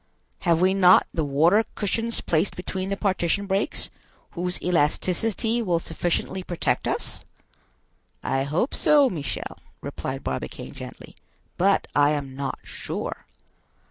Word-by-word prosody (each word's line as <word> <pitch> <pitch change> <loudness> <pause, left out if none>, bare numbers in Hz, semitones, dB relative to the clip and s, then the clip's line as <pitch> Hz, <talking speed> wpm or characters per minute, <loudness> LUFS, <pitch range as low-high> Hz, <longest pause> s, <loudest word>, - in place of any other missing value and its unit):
"Have 170 -2 +2
we 185 +1 +4
not 185 -2 +7
the 160 - 0
water 160 +10 +4
cushions 225 +3 -1
placed 165 +4 +1
between 185 +1 -4
the 200 - -1
partition 195 -1 +1
breaks, 195 +1 -1 0.4
whose 180 0 -2
elasticity 185 +7 +1
will 180 -6 +1
sufficiently 175 +3 -2
protect 175 -2 -1
us?" - - -2 1.0
"I 135 - +1
hope 160 - 0
so, 285 -4 +5
Michel," 150 -5 -4 0.2
replied - - -5
Barbicane - - -4
gently, - - -10 0.4
"but 195 +2 +3
I 145 +1 +5
am 140 -3 -4
not 140 0 -3
sure." - - -5
180 Hz, 125 wpm, -25 LUFS, 160-200 Hz, 1.0 s, not